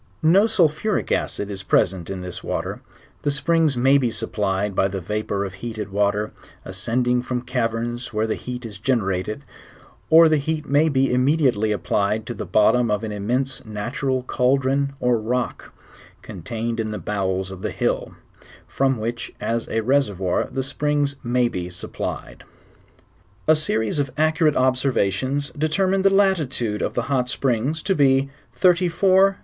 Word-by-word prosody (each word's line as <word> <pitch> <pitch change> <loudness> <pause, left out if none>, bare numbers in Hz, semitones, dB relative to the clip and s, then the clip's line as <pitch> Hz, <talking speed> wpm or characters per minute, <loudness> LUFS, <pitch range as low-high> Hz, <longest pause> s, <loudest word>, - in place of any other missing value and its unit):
Ao 195 +7 +6
sulphuric 200 -1 +1
acid 100 0 -1
is 95 -2 -5
present 95 -2 +1
in 95 -1 -4
this 90 -1 -6
water; - - -3 0.4
the - - 0
springs 155 0 +1
muy 135 +3 +5
be 125 -3 +1
supplied 105 -2 -2
by 95 - +3
the 95 0 -4
vapour 100 +1 -2
of 95 - -6
heated 110 0 -6
water, 105 +1 0 0.3
a& - - -7
cendiug 120 +6 0
from 125 -1 -3
civerns 120 0 -2
where 110 0 0
the 110 - -1
heal 125 0 -5
is 105 -4 -8
generated, 105 0 -1 0.7
or 165 +1 +8
Uie 155 -2 +3
lieat 155 0 -2
may 145 +3 +3
be 135 -3 +2
immediately 125 -5 +2
applied' 105 +3 0
to 120 - -4
the - - -6
bottom 115 +2 +3
of 105 +1 0
an 110 - -3
im 100 -1 -5
mense 130 +2 -1
natural 125 +4 -2
chaldron 135 +2 +1
or 125 -2 +2
rock, 125 +3 -3 0.5
contained 115 0 -4
in 110 - -1
the 105 - -4
bowels 95 -3 -2
of 95 -1 -9
the - - -2
hill, - - -2 0.5
tiviii 135 -1 +1
whicii 115 +2 -4
as 115 0 -2
a 115 - 0
reservoir 105 -8 +1
the 135 - -2
springs 145 +1 0
may 120 0 +2
bo 90 -5 -4
sup 90 0 -9
plied. - - -5 1.0
A 155 - +6
serie.8 145 -5 -1
of 140 -1 0
accurate 155 0 +3
observations 130 0 +1
determined/ 185 +6 +1
the 195 - +6
latitude 155 - +1
(f - - -1
the 120 - 0
hot 130 -1 0
tarings 135 +5 -1
to 195 - +1
ba34. 135 -1 +3 0.3
31..4E 185 +2 +4
125 Hz, 160 wpm, -22 LUFS, 105-145 Hz, 1.0 s, or